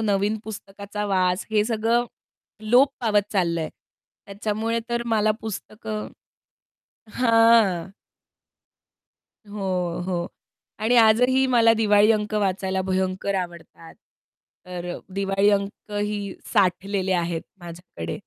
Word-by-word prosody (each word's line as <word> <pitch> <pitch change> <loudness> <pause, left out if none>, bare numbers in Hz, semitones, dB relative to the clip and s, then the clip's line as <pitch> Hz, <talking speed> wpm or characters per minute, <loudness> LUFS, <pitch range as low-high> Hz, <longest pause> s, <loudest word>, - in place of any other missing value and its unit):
नवीन 205 0 0
पुस्तकाचा 205 -1 -7
वास, 185 -1 +1
हे 210 -1 +2
सगळं 230 +1 +1 0.7
लोप 260 +3 +6
पावत 210 -4 +1
चाललंय 170 -5 0 0.6
त्याच्यामुळे 215 +3 -2
तर 235 0 0
मला 215 -2 +2
पुस्तकं 215 0 -6 1.1
हां. 225 -7 +4 1.6
हो, 185 -4 -2
हो. 175 -2 -2 0.5
आणि 225 +3 +2
आजही 250 +4 +5
मला 230 -3 +5
दिवाळी 210 -1 +4
अंक 210 0 -2
वाचायला 190 -2 0
भयंकर 190 +1 -1
आवडतात. 170 -2 -6 0.7
तर 180 -1 -6
अ, - - -7 0.2
दिवाळी 195 +1 +2
अंकही 205 0 -2 0.2
साठलेले 190 -1 +1
आहेत 170 -2 -1 0.2
माझ्याकडे. 170 - -7
205 Hz, 100 wpm, -24 LUFS, 185-220 Hz, 1.6 s, लोप